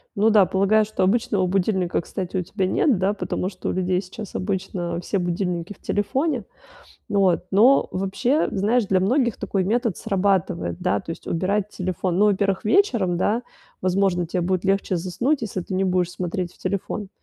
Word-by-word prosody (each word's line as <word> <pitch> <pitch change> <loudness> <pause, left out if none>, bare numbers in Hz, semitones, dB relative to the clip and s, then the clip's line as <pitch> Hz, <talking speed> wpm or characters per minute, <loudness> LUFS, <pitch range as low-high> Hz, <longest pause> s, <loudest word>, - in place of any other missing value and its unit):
Ну 215 +2 +4
да, 210 -3 +6
полагаю, 195 +4 +3
что 210 -2 -2
обычного 200 -1 +2
будильника, 185 -1 0
кстати, 185 +1 -5
у - - +1
тебя 190 +2 -2
нет, 230 +5 +2
да, 190 +2 +1
потому 190 -2 -3
что - - -5
у - - +1
людей 185 0 0
сейчас 195 +2 -9
обычно 180 -3 -2
все 195 +2 -1
будильники 175 +1 -2
в - - -26
телефоне. 255 - -1 0.6
Вот, 195 -5 +2
но 235 +8 +5
вообще, 235 - 0
знаешь, 210 +4 +1
для 190 -1 +2
многих 240 +4 +1
такой 195 -2 -1
метод 230 0 0
срабатывает, 185 - 0
да, 100 - 0
то - - -9
есть 165 - -8
убирать 195 +4 0
телефон. 185 -1 -2
Ну, 210 - +5
во-первых, 195 -1 +1
вечером, 215 - +2
да, 215 +6 +1 0.4
возможно, 185 -1 +1
те 180 +2 -2
будет 185 +1 -1
легче 195 -1 +1
заснуть, 235 - -1
если 200 -4 -3
ты 185 - -6
не 190 +1 +1
будешь 180 -2 +1
смотреть 180 0 -3
в - - -25
телефон. 200 +1 -3
190 Hz, 180 wpm, -23 LUFS, 180-210 Hz, 0.6 s, да